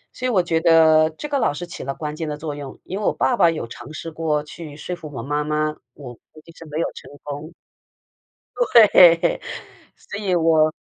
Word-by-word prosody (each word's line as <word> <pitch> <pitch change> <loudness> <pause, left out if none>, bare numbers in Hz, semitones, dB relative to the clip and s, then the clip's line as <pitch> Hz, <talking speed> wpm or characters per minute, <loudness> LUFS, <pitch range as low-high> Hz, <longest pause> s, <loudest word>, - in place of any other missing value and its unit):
所 255 - -3
以 - - 0
我 195 -7 +2
觉 165 -1 0
得 160 -2 +5
这 160 - -7
个 285 -1 -1
老 145 - +1
师 175 - -5
起 175 - -9
了 135 +1 -4
关 150 -1 -5
键 155 0 -4
的 150 - -4
作 150 0 -5
用， 140 -2 -9
因 190 - -5
为 - - -5
我 - - +3
爸 255 - +1
爸 170 - +4
有 160 -7 -4
尝 120 +3 -11
试 165 +1 -7
过 155 -2 -1
去 150 0 -10
说 180 +3 -5
服 165 -3 -10
我 115 -5 -6
妈 145 +3 -1
妈， 150 0 -1 0.2
我 130 -4 -10 0.2
估 155 - -16
计 165 - -14
是 165 - -12
没 150 +1 -4
有 - - +1
成 - - -12
功。 145 +2 -7 1.0
对， 205 - +5 0.5
所 200 - -9
以 195 -4 0
我 160 -2 +3
160 Hz, 235 characters per minute, -21 LUFS, 150-175 Hz, 1.0 s, 得